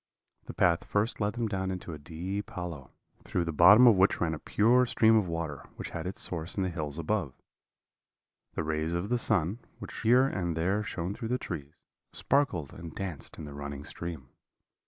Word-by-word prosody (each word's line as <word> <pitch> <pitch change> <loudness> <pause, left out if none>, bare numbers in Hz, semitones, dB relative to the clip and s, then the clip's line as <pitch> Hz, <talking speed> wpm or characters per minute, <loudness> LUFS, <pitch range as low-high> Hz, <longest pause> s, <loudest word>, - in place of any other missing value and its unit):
"The - - -8
path 85 -1 +3
first 105 +2 0
led 105 0 +1
them 120 -1 -1
down 95 -2 -2
into 90 -2 -5
a 75 - -8
deep 90 +7 -5
hollow, 85 -7 -6 0.3
through 85 - -1
the 85 - -2
bottom 100 +10 +8
of 115 -4 +8
which 95 +2 +4
ran 80 -2 0
a 80 - -5
pure 120 +9 +3
stream 110 -1 +4
of 105 -4 +3
water, 80 -4 -4
which - - -6
had - - -4
its 95 - -5
source 85 +1 -3
in 95 - +1
the 95 - -1
hills 75 -3 -3
above. 85 -5 -1 1.2
The - - -2
rays 80 +2 -1
of 90 +4 -2
the 125 0 +2
sun, 90 +2 +2 0.2
which - - -8
here 125 +3 +5
and 85 -10 -2
there 95 +6 +1
shone 90 -2 -3
through 115 - -5
the 125 +2 0
trees, 75 - -6 0.4
sparkled 100 - 0
and 80 -1 -9
danced 90 -7 -5
in 80 - -7
the 75 - -8
running 70 0 -6
stream. 80 -5 -7
90 Hz, 200 wpm, -29 LUFS, 80-105 Hz, 1.2 s, bottom